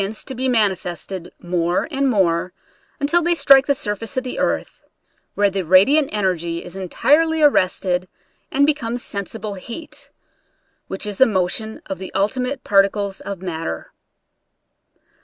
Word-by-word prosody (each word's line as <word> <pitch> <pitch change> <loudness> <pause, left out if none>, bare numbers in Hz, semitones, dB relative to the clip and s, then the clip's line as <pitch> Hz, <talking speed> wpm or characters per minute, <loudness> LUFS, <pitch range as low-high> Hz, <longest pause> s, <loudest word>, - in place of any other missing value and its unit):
45 200 +3 -4
to 265 - -5
be 260 +1 -1
manifested 190 -5 -1
more 175 0 -1
and 275 -1 +1
more 180 -5 +1 0.5
till 345 +4 +3
they 345 +1 +2
strike 275 -4 +6
the 280 - +3
surface 210 -1 -4
of 260 - +1
the 255 - -5
earth, - - -2 0.5
where 205 -1 +2
the 195 0 -1
radiant 200 - +4
energy 175 -5 -1
is 175 - -10
entirely 305 - +2
arrested 185 -8 +2 0.4
and 280 +1 +3
be 305 - +4
comes 245 -4 -4
sensible 205 +1 -5
heat, 235 - -8 0.8
which 190 +2 -4
is 205 +1 -5
a 265 - +8
motion 215 +2 -2
of 190 - -5
the 190 - -7
ultimate 250 +6 -1
particles 200 0 +2
of 195 -2 -7
matter. 160 - -5
205 Hz, 145 wpm, -20 LUFS, 185-260 Hz, 0.8 s, a